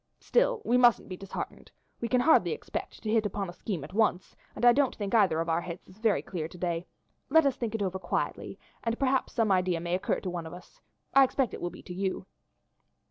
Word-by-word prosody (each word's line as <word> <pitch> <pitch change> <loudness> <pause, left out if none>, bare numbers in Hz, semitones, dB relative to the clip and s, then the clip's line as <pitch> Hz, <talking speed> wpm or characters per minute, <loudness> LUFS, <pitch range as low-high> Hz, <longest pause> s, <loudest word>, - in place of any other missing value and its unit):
Still - - +1
we 245 - +3
mustn't 240 -5 +4
be 185 - -4
disheartened. 195 +1 -7 0.3
We 235 - -2
can 250 +1 +2
hardly 320 - +4
expect - - -6
to 215 - -1
hit 220 -2 +3
upon 195 -2 -4
a - - -15
scheme 180 -4 -4
at 155 - -10
once, 205 -4 +1 0.2
and - - 0
I 240 - +8
don't 280 -1 +2
think 205 -2 -4
either 195 -8 +4
of 165 - -1
our 165 +1 +1
heads 170 0 -8
is 185 +3 -17
very 220 -2 +2
clear 165 -4 -4
to 180 - -13
day; 170 -1 -2 0.4
let 320 +2 +5
us 275 -2 +2
think 230 -2 -3
it 215 - -1
over 190 -1 -2
quietly, 175 - -3 0.3
and 230 0 -1
perhaps 265 -1 +1
some 225 -4 +2
other 185 - +5
idea 180 -2 -1
may 170 +1 -3
occur 185 - 0
to 185 - -3
one 170 -2 -4
of 160 - -8
us, 180 - -15 0.3
I 275 - +8
expect 265 -1 0
it - - -7
will 175 - -1
be - - -13
to 180 - -8
you. 190 +1 -2
200 Hz, 245 wpm, -29 LUFS, 180-240 Hz, 0.4 s, I